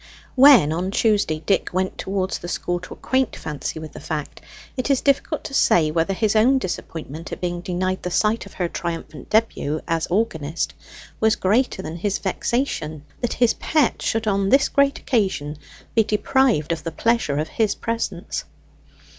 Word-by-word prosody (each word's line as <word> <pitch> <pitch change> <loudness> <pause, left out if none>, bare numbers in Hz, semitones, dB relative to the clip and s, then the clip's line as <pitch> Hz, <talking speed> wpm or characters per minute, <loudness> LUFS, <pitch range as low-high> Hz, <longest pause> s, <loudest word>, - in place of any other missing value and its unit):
When 255 - +7
on 180 +3 -2
Tuesday, 200 -7 +1
Dick 195 - +1
went 185 +1 -1
towards 190 -1 -2
the 175 - -7
school 175 0 -2
to 180 - -9
acquaint 260 -1 0
Fancy 150 0 -5
with 155 -1 -8
the - - -10
fact, 150 -2 -5 0.3
it 255 +1 -2
is 275 -2 +3
difficult 280 +2 +1
to - - -7
say 160 -11 +4
whether 170 +4 0
his 215 +1 +1
own 245 +5 +5
disappointment 165 - -5
at - - -5
being 175 -1 -2
denied 185 +1 -2
the 180 - -3
sight 215 +5 +1
of - - -14
her 180 - -1
triumphant 165 -5 -5
debut 215 -9 +1
as 165 -1 0
organist, 170 -6 -1 0.5
was 220 0 +3
greater 210 0 +1
than 160 +2 -5
his 200 +3 -1
vexation 185 - -2 0.2
that 240 - -1
his 240 -1 +3
pet 305 -5 +1
should 225 0 0
on 195 -2 +1
this 270 +3 +4
great 280 0 +3
occasion 185 - -1 0.3
be 225 - +4
deprived 215 - +2
of 165 -2 -2
the 165 - -3
pleasure 230 -6 +1
of 155 +1 -1
his 215 -3 +1
presence. 225 -6 -3
190 Hz, 170 wpm, -22 LUFS, 165-230 Hz, 0.5 s, When